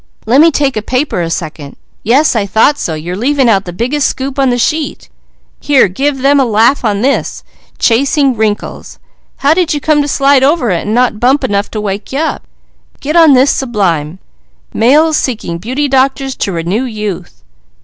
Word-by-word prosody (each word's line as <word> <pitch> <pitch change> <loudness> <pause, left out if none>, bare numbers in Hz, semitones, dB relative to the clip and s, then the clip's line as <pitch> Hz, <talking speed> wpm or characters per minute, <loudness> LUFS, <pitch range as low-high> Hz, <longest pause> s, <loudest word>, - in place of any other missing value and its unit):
Lemme 275 +9 +5
take 280 -2 0
a 215 - -2
paper 255 -2 -2
a 165 - -3
second. 155 -4 -6 0.3
Yes, 265 +6 +2
I 205 -3 0
thought 225 +9 +2
so! 160 - -3
You're 170 +4 -6
leaving 265 +5 +1
out 200 -4 +2
the 175 - -6
biggest 255 +10 -1
scoop 270 +1 -4
on 270 -1 +2
the 245 - 0
sheet! 305 +5 -2 0.5
Here, 280 -6 +3
give 270 +8 -2
them 280 +1 +4
a - - +4
laugh 235 +4 +2
on 205 -3 -1
this 275 +2 -1 0.3
'Chasing 270 +2 +1
Wrinkles.' 215 -1 -3 0.5
How 290 - +5
did 340 -2 0
you - - -2
come 295 +1 +1
to 290 - -2
slide 275 -1 +2
over 270 - +1
it 175 +2 -2
and 215 - -1
not 245 -3 +1
bump 265 +4 +2
enough 205 -4 -1
to 215 - -5
wake 200 0 -5
you 270 - -3
up? 320 +2 -3 0.5
Get 300 +3 -4
on 325 -4 +6
this 265 +2 +4
sub 245 -4 -4
line, 165 -5 -1 0.6
'Males 300 +7 +3
seeking 210 -9 -3
beauty 255 +9 -2
doctors 270 0 0
to 195 - -2
renew 180 +8 -2
youth.'" 210 - -6
255 Hz, 190 wpm, -12 LUFS, 205-280 Hz, 0.6 s, on